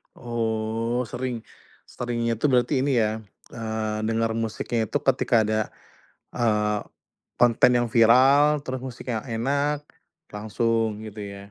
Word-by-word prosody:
Oh 115 Hz, 0 st, -2 dB
sering 125 Hz, -1 st, -4 dB, 0.5 s
seringnya 120 Hz, -1 st, -2 dB
itu 115 Hz, -, -1 dB
berarti 130 Hz, 0 st, +2 dB
ini 130 Hz, -5 st, +2 dB
ya, 110 Hz, 0 st, 0 dB, 0.3 s
eee, 110 Hz, -1 st, -3 dB
dengar 115 Hz, 0 st, +1 dB
musiknya 115 Hz, 0 st, -2 dB
itu -, -, -1 dB
ketika 115 Hz, -, +3 dB
ada, 110 Hz, 0 st, 0 dB, 0.7 s
eee, 105 Hz, -3 st, +1 dB, 0.6 s
konten 120 Hz, 0 st, +4 dB
yang 120 Hz, -1 st, +2 dB
viral, 135 Hz, +6 st, +5 dB
terus 130 Hz, -2 st, -4 dB
musiknya 125 Hz, -2 st, -5 dB
enak 140 Hz, +5 st, -1 dB, 0.5 s
langsung 110 Hz, +1 st, -1 dB
gitu 110 Hz, -1 st, -9 dB
ya. 100 Hz, -1 st, -8 dB
115 Hz, 120 wpm, -25 LUFS, 110-125 Hz, 0.7 s, viral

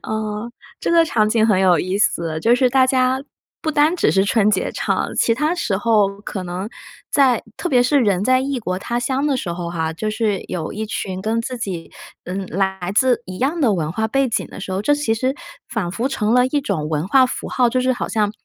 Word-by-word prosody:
嗯， 215 Hz, +1 st, -3 dB, 0.3 s
这 -, -, -1 dB
个 335 Hz, -1 st, +5 dB
场 215 Hz, -8 st, +1 dB
景 220 Hz, 0 st, +3 dB
很 210 Hz, -4 st, +3 dB
有 180 Hz, -3 st, +4 dB
意 185 Hz, +4 st, -1 dB
思， 165 Hz, -6 st, 0 dB
就 235 Hz, +7 st, +4 dB
是 255 Hz, 0 st, +3 dB
大 260 Hz, 0 st, +4 dB
家 260 Hz, 0 st, +1 dB, 0.4 s
不 315 Hz, -, -1 dB
单 305 Hz, +2 st, +3 dB
只 -, -, +2 dB
是 195 Hz, 0 st, +3 dB
春 210 Hz, 0 st, +3 dB
节 190 Hz, -3 st, 0 dB
唱， -, -, -1 dB
其 230 Hz, -, +3 dB
它 300 Hz, +7 st, 0 dB
时 220 Hz, -, -1 dB
候 205 Hz, -2 st, +1 dB
可 195 Hz, -2 st, -5 dB
能 180 Hz, +4 st, -4 dB, 0.4 s
在 260 Hz, -5 st, +3 dB
特 350 Hz, -, -3 dB
别 250 Hz, -4 st, +4 dB
是 280 Hz, +3 st, +3 dB
人 200 Hz, -5 st, +2 dB
在 255 Hz, +3 st, +3 dB
异 270 Hz, 0 st, -2 dB
国 185 Hz, -5 st, -3 dB
他 235 Hz, +5 st, -3 dB
乡 265 Hz, +3 st, 0 dB
的 280 Hz, -3 st, +1 dB
时 175 Hz, -8 st, -3 dB
候 170 Hz, 0 st, -5 dB
哈， 160 Hz, -1 st, -2 dB
就 215 Hz, +6 st, -3 dB
是 215 Hz, -3 st, -1 dB
有 165 Hz, -3 st, -4 dB
一 220 Hz, -, -4 dB
群 190 Hz, -3 st, -4 dB
跟 225 Hz, +1 st, 0 dB
自 250 Hz, +2 st, -5 dB
己， 185 Hz, -7 st, -5 dB, 0.3 s
嗯， 190 Hz, +1 st, -4 dB
来 190 Hz, 0 st, -2 dB
自 245 Hz, 0 st, +3 dB
一 185 Hz, 0 st, -7 dB
样 300 Hz, +6 st, 0 dB
的 235 Hz, -7 st, +3 dB
文 155 Hz, -5 st, -1 dB
化 220 Hz, +6 st, -1 dB
背 270 Hz, +3 st, +1 dB
景 230 Hz, 0 st, -1 dB
的 -, -, -10 dB
时 190 Hz, -, -6 dB
候， 190 Hz, -, -1 dB
这 290 Hz, +7 st, +3 dB
其 290 Hz, -6 st, 0 dB
实 255 Hz, +4 st, -1 dB, 0.3 s
仿 210 Hz, -7 st, -2 dB
佛 230 Hz, +7 st, -2 dB
成 215 Hz, -5 st, 0 dB
了 250 Hz, 0 st, +5 dB
一 290 Hz, +2 st, 0 dB
种 165 Hz, -, -2 dB
文 155 Hz, +2 st, -1 dB
化 260 Hz, +4 st, +6 dB
符 250 Hz, -, -5 dB
号， 250 Hz, -2 st, +2 dB
就 255 Hz, +2 st, 0 dB
是 255 Hz, 0 st, +2 dB
好 -, -, -4 dB
像 210 Hz, -2 st, 0 dB
220 Hz, 255 characters per minute, -20 LUFS, 190-255 Hz, 0.4 s, 化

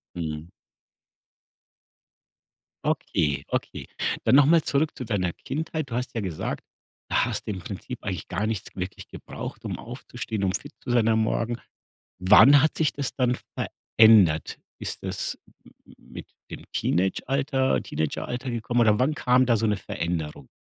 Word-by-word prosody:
Mhm. 80 Hz, -1 st, -5 dB, 2.3 s
Okay, 70 Hz, -2 st, 0 dB
okay. -, -, -3 dB, 0.4 s
Dann 115 Hz, -, +4 dB
noch 140 Hz, 0 st, +7 dB
mal 165 Hz, +1 st, +5 dB
zurück 145 Hz, +2 st, 0 dB
zu 125 Hz, -, -5 dB
deiner 100 Hz, -6 st, -1 dB
Kindheit. 155 Hz, -, -4 dB
Du -, -, -4 dB
hast 125 Hz, +1 st, -3 dB
ja 115 Hz, -, -1 dB
gesagt: 90 Hz, -6 st, -4 dB, 0.4 s
„Da -, -, +2 dB
hast -, -, -3 dB
du -, -, -2 dB
im 95 Hz, -, -6 dB
Prinzip 105 Hz, +7 st, -7 dB
eigentlich 95 Hz, -6 st, -4 dB
gar 95 Hz, +4 st, -1 dB
nichts 110 Hz, -3 st, -4 dB
wirklich 90 Hz, 0 st, -6 dB
gebraucht, -, -, -8 dB
um -, -, -4 dB
aufzustehen, 110 Hz, -3 st, -6 dB
um 95 Hz, -, +1 dB
fit 145 Hz, +10 st, -5 dB
zu 125 Hz, -, -7 dB
sein 120 Hz, -2 st, +3 dB
am 110 Hz, 0 st, +3 dB
Morgen“. 115 Hz, +2 st, -1 dB, 0.6 s
Wann 130 Hz, +9 st, +8 dB
hat 155 Hz, -, +1 dB
sich 155 Hz, -2 st, +2 dB
das 140 Hz, -2 st, -3 dB
dann 125 Hz, -2 st, +2 dB, 0.2 s
verändert? 105 Hz, -9 st, +4 dB, 0.2 s
Ist -, -, -5 dB
das -, -, -3 dB, 0.3 s
m -, -, -18 dB, 0.3 s
m -, -, -21 dB
mit -, -, -8 dB, 0.2 s
dem -, -, -8 dB
Teenagealter 130 Hz, -, +1 dB
Teenageralter 125 Hz, -, -3 dB
gekommen 120 Hz, +1 st, 0 dB
oder 105 Hz, -2 st, +4 dB
wann 135 Hz, +5 st, +2 dB
kam 125 Hz, -2 st, +3 dB
da 120 Hz, -2 st, +4 dB
so 110 Hz, +1 st, +1 dB
'ne 105 Hz, -1 st, +2 dB
Veränderung? 80 Hz, -7 st, -4 dB
115 Hz, 155 wpm, -26 LUFS, 95-130 Hz, 2.3 s, Wann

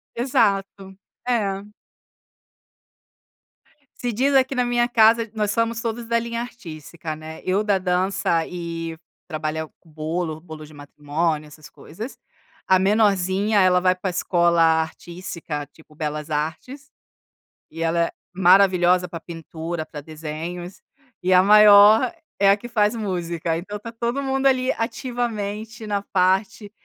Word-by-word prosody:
Exato, 200 Hz, -5 st, 0 dB, 0.3 s
é. 200 Hz, -5 st, 0 dB, 2.3 s
Se 245 Hz, -1 st, -2 dB
diz 270 Hz, +6 st, +1 dB
aqui 265 Hz, 0 st, +3 dB
na 250 Hz, -, +1 dB
minha 240 Hz, 0 st, +1 dB
casa, 230 Hz, -1 st, +4 dB
nós 210 Hz, -2 st, -1 dB
somos 230 Hz, 0 st, 0 dB
todos 230 Hz, 0 st, -4 dB
da 235 Hz, 0 st, +2 dB
linha 235 Hz, 0 st, -4 dB
artística, 165 Hz, -8 st, -8 dB
né, 155 Hz, +1 st, -10 dB
eu 190 Hz, +3 st, +1 dB
da 205 Hz, -2 st, +2 dB
dança 180 Hz, -2 st, 0 dB
e 165 Hz, -2 st, -5 dB, 0.3 s
trabalhar 155 Hz, -1 st, -3 dB
com 165 Hz, -, -24 dB
bolo 160 Hz, +1 st, -4 dB
bolo 155 Hz, -3 st, -10 dB
de 150 Hz, -, -16 dB
matrimônio 150 Hz, +2 st, -3 dB
essas 150 Hz, -2 st, -14 dB
coisas, 215 Hz, -, -9 dB, 0.5 s
a 190 Hz, -, +5 dB
menorzinha 200 Hz, 0 st, +2 dB
ela 180 Hz, -1 st, +4 dB
vai 185 Hz, 0 st, +2 dB
para 185 Hz, +1 st, -3 dB
escola 170 Hz, -1 st, +2 dB
artística 160 Hz, -1 st, -1 dB
tipo 155 Hz, -1 st, -21 dB
Belas 150 Hz, 0 st, -4 dB
Artes, 160 Hz, -, -4 dB, 0.8 s
e 165 Hz, +1 st, -8 dB
ela 170 Hz, +1 st, +1 dB
é -, -, -9 dB, 0.2 s
maravilhosa 180 Hz, -1 st, +4 dB
para 165 Hz, -1 st, -7 dB
pintura, 165 Hz, 0 st, -6 dB
para 150 Hz, -, -9 dB
desenhos, 160 Hz, +4 st, -7 dB, 0.4 s
e 185 Hz, +1 st, 0 dB
a 180 Hz, -, +7 dB
maior 210 Hz, -, +7 dB, 0.3 s
é 195 Hz, 0 st, +5 dB
a 200 Hz, -, +5 dB
que 240 Hz, -, -9 dB
faz 215 Hz, -1 st, +1 dB
música, 170 Hz, -5 st, -2 dB
então 205 Hz, +4 st, -6 dB
tá 230 Hz, +2 st, -8 dB
todo 235 Hz, +4 st, -2 dB
mundo, 270 Hz, 0 st, +1 dB
ali, 255 Hz, -1 st, +2 dB
ativamente 225 Hz, -2 st, -4 dB
na 205 Hz, -1 st, -1 dB
parte 195 Hz, +2 st, 0 dB
185 Hz, 135 wpm, -22 LUFS, 165-220 Hz, 2.3 s, a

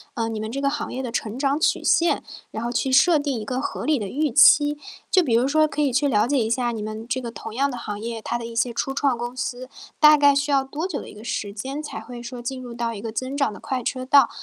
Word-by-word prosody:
呃， 230 Hz, -1 st, -1 dB
你 220 Hz, -1 st, -4 dB
们 220 Hz, +1 st, -4 dB
这 275 Hz, -, -3 dB
个 280 Hz, 0 st, +1 dB
行 290 Hz, +1 st, -4 dB
业 260 Hz, -, -4 dB
的 255 Hz, -, -4 dB
成 230 Hz, 0 st, -3 dB
长 275 Hz, 0 st, +1 dB
曲 315 Hz, -, +1 dB
线， 340 Hz, 0 st, +2 dB, 0.3 s
然 220 Hz, -, -5 dB
后 235 Hz, -, -2 dB
去 255 Hz, +2 st, -1 dB
设 315 Hz, +6 st, +5 dB
定 285 Hz, -4 st, -2 dB
一 215 Hz, -, -6 dB
个 255 Hz, 0 st, -2 dB
合 -, -, -4 dB
理 305 Hz, -1 st, +2 dB
的 210 Hz, -5 st, -4 dB
预 295 Hz, +9 st, 0 dB
期， 290 Hz, +3 st, +6 dB, 0.3 s
就 370 Hz, -, +4 dB
比 255 Hz, -8 st, 0 dB
如 240 Hz, +3 st, +3 dB
说 310 Hz, +2 st, +3 dB
可 300 Hz, -, -3 dB
以 285 Hz, -2 st, +2 dB
去 275 Hz, +4 st, +2 dB
了 215 Hz, -4 st, +2 dB
解 285 Hz, +2 st, +1 dB
一 225 Hz, -4 st, +1 dB
下 240 Hz, +1 st, 0 dB
你 220 Hz, -2 st, -5 dB
们 215 Hz, +1 st, -6 dB
这 260 Hz, -, -1 dB
个 240 Hz, -2 st, -6 dB
同 225 Hz, 0 st, -8 dB
样 280 Hz, +2 st, +1 dB
的 -, -, -5 dB
行 210 Hz, -4 st, -5 dB
业， 230 Hz, +1 st, -5 dB
它 240 Hz, -, -2 dB
的 235 Hz, -, -7 dB
一 230 Hz, 0 st, -8 dB
些 240 Hz, +1 st, +1 dB
初 270 Hz, +3 st, -2 dB
创 270 Hz, -3 st, +1 dB
公 240 Hz, +1 st, -5 dB
司， 255 Hz, -1 st, -4 dB, 0.3 s
大 305 Hz, 0 st, +8 dB
概 285 Hz, -1 st, +5 dB
需 285 Hz, +1 st, 0 dB
要 275 Hz, -1 st, +3 dB
多 295 Hz, +6 st, -4 dB
久 380 Hz, -, -4 dB
的 -, -, -10 dB
一 -, -, -13 dB
个 210 Hz, -, -11 dB
时 215 Hz, -3 st, -3 dB
间， 265 Hz, +8 st, -5 dB
才 300 Hz, -, -6 dB
会 245 Hz, -1 st, -9 dB
说 240 Hz, +1 st, -7 dB
进 255 Hz, +2 st, -5 dB
入 245 Hz, -2 st, -8 dB
到 235 Hz, -1 st, -2 dB
一 205 Hz, -, -7 dB
个 225 Hz, 0 st, -5 dB
增 255 Hz, +4 st, -4 dB
长 280 Hz, -5 st, +1 dB
的 205 Hz, -, -10 dB
快 260 Hz, -2 st, -3 dB
车 255 Hz, +2 st, -3 dB
道， 275 Hz, +2 st, +6 dB
255 Hz, 320 characters per minute, -23 LUFS, 230-280 Hz, 0.3 s, 大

